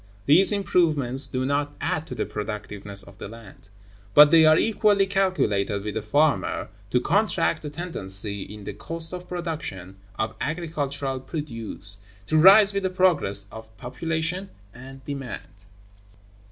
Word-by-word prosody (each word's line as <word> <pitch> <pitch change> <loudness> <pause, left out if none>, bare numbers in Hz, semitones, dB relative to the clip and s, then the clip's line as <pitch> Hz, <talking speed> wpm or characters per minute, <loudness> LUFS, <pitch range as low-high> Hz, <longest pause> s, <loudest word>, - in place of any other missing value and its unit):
These 180 +9 +5
improvements 155 -9 +2
do 130 -1 -2
not 145 +1 -1
add 160 +1 -2
to 125 - -6
the 110 - -2
productiveness 105 -2 -5
of - - -16
the - - -6
land, 110 -2 -14 0.5
but 150 0 +9
they 160 -1 +7
are 155 0 +6
equally 210 -2 +3
calculated 145 - 0
with 105 0 -4
the 110 - -3
former 145 +8 +1 0.2
to - - +2
counteract 85 0 +1
the 150 - -5
tendency 100 - -4
in 105 +1 -9
the 105 - -6
cost 160 - -3
of 180 0 -8
production 155 - -5 0.2
of 110 0 -2
agricultural 140 -4 -3
produce, 115 - -5 0.3
to 155 +6 +2
rise 200 +4 +8
with 200 - -1
the 190 - 0
progress 175 - +2
of 110 0 -12
population 165 +8 -3 0.2
and 135 +2 -12
demand. 120 - -8
140 Hz, 145 wpm, -24 LUFS, 105-165 Hz, 0.5 s, but